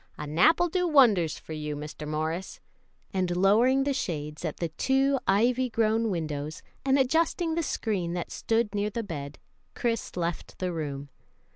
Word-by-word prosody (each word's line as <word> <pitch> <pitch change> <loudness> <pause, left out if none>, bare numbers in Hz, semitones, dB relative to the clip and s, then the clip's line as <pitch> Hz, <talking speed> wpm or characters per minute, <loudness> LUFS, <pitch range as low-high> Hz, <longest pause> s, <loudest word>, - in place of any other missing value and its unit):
"A 150 - -5
nap'll 315 - +4
do 360 +1 0
wonders 215 - +4
for 160 - -9
you, 150 -1 -4
Mr. 150 +1 -7
Morris;" 160 +4 -3 0.5
and 180 -2 0
lowering 235 +8 +4
the 280 0 0
shades 155 - -4
at 160 -3 -3
the 170 - -2
two 270 - +2
ivy 245 +6 +3
grown 225 0 +1
windows, 155 -4 -4 0.2
and 270 0 +3
adjusting 320 +5 +1
the 335 - 0
screen 195 - -2
that 175 -1 -4
stood 225 -2 0
near 205 0 0
the 230 +2 -3
bed, 145 -7 -6 0.4
Chris 230 -5 -2
left 170 -1 -3
the 180 -1 -2
room. 145 -3 -4
195 Hz, 160 wpm, -28 LUFS, 155-255 Hz, 0.5 s, nap'll